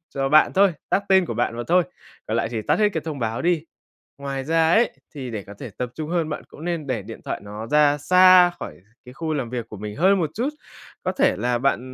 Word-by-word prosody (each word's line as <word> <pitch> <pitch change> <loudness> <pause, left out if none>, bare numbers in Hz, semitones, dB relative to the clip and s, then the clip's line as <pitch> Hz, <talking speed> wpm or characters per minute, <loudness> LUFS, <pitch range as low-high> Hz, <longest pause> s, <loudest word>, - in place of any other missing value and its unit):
cho 135 0 0
bạn 155 +2 +5
thôi, 195 -1 +4 0.2
tag - - +3
tên 190 -1 +5
của - - -4
bạn 115 - -1
mà 120 - -3
thôi, 180 +2 +4 0.4
còn 110 - -1
lại 115 - -1
thì 115 -2 -3
tắt - - 0
hết 210 -1 +4
cái 160 - -2
thông 155 -4 -5
báo 115 -1 -2
đi. 170 -2 +1 0.6
Ngoài 135 -1 -4
ra 160 +2 +2
ấy, 230 +6 +4 0.2
thì 130 -4 -6
để 110 -3 -5
có 100 - -11
thể 125 - -8
tập 125 -1 -3
trung 155 +2 -5
hơn 170 -3 0
bạn 150 - -5
cũng 155 - -12
nên 170 -4 -3
để 125 -6 -2
điện - - -10
thoại - - -4
nó 105 +2 -7
ra 145 +1 +3
xa 180 +3 +6
khỏi - - -6 0.3
cái 125 - -12
khu 160 +2 -3
làm 130 -6 -3
việc 120 -2 -5
của 110 - -9
mình 105 +1 -7
hơn 190 +5 +4
một 160 -5 -1
chút, 245 +5 -1 0.6
có 185 - 0
thể 185 - +2
là 120 +2 0
bạn 135 0 +1
150 Hz, 255 wpm, -23 LUFS, 120-175 Hz, 0.6 s, xa